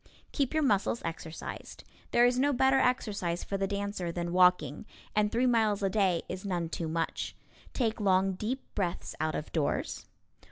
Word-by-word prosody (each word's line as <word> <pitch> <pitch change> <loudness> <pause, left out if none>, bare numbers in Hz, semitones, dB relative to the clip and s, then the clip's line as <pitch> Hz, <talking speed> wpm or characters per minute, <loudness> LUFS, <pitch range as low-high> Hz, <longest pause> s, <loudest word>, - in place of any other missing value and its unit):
Keep 280 0 -1
your 310 - +3
muscles 215 -2 +1
exercised. 165 0 -6 0.3
There 240 0 +5
is 245 +1 +3
no 285 +2 +3
better 265 +1 +4
exercise 200 -9 0
for 200 - -4
the 195 0 0
dancer 200 -3 -3
than 170 0 -3
walking, 180 -2 +3 0.3
and 210 0 +2
three 240 +2 +2
miles 220 -4 +2
a 195 - +1
day 190 -5 +2
is 185 +1 -5
none 175 -4 -2
too 165 0 -3
much. 165 +1 -2 0.4
Take 225 -4 -1
long 190 -1 +3
deep 230 +8 -3
breaths 180 -4 -2
out 155 0 0
of 150 - -5
doors. 145 -3 -1
195 Hz, 170 wpm, -30 LUFS, 175-230 Hz, 0.4 s, There